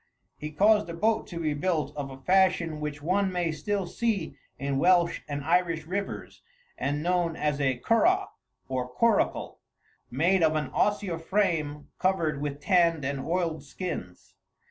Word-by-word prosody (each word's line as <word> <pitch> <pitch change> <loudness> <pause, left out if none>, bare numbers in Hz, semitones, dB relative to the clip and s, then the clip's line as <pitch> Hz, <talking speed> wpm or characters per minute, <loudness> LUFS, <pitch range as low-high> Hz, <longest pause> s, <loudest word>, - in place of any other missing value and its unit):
He 150 - -4
caused 205 +5 +3
a 170 - -5
boat 220 +5 +1
to 170 - -6
be 155 -3 0
built 155 +1 -1
of 145 -2 -4
a 135 - -9
fashion 180 0 +2
which 150 -1 -5
one 190 +3 +1
may 175 -2 0
still 200 +5 -2
see 200 -7 -2 0.2
in 140 +1 -1
Welsh 175 +1 +3
and 145 -1 -4
Irish 165 -1 +1
rivers, 195 +4 -5 0.3
and 145 +2 -2
known 175 -2 +1
as 150 -2 -1
a 130 -2 +1
curragh 350 - +2 0.4
or 130 -1 -2
coracle; 225 - +1 0.5
made 170 +9 +2
of 160 -1 +3
an 155 -1 -2
osier 205 -5 0
frame 165 -6 -1
covered 165 -6 +1
with 145 -1 -3
tanned 170 -5 +3
and 140 0 -2
oiled 165 +1 -1
skins. 135 - -6
165 Hz, 155 wpm, -27 LUFS, 145-185 Hz, 0.5 s, caused